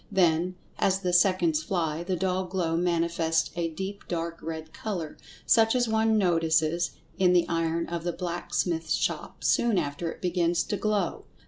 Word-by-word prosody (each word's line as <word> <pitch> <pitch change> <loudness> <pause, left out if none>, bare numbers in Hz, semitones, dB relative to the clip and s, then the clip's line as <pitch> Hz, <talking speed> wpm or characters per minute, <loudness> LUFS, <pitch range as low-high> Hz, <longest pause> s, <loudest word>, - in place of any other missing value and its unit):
Then, 180 -1 +2 0.2
as 190 0 +2
the 180 -2 -1
seconds 175 -3 +3
fly, 165 -2 -1
the 185 +1 -1
dull 185 +1 0
glow 180 -3 -1
manifests 170 -1 +1
a 170 -1 -1
deep 190 +5 -6
dark 170 -1 -3
red 160 0 -6
color, 175 -8 -4 0.3
such 225 +1 +4
as 245 -1 +2
one 220 0 +2
notices 165 -2 +2 0.3
in 180 -1 +5
the 175 -1 +4
iron 165 0 0
of 170 -1 -4
the 175 - -1
blacksmith's 170 -2 -2
shop, - - -3
soon 235 -4 +3
after 160 +1 -2
it - - -11
begins 175 -1 +1
to 205 - -3
"glow." 210 -4 -1
175 Hz, 160 wpm, -27 LUFS, 165-190 Hz, 0.3 s, in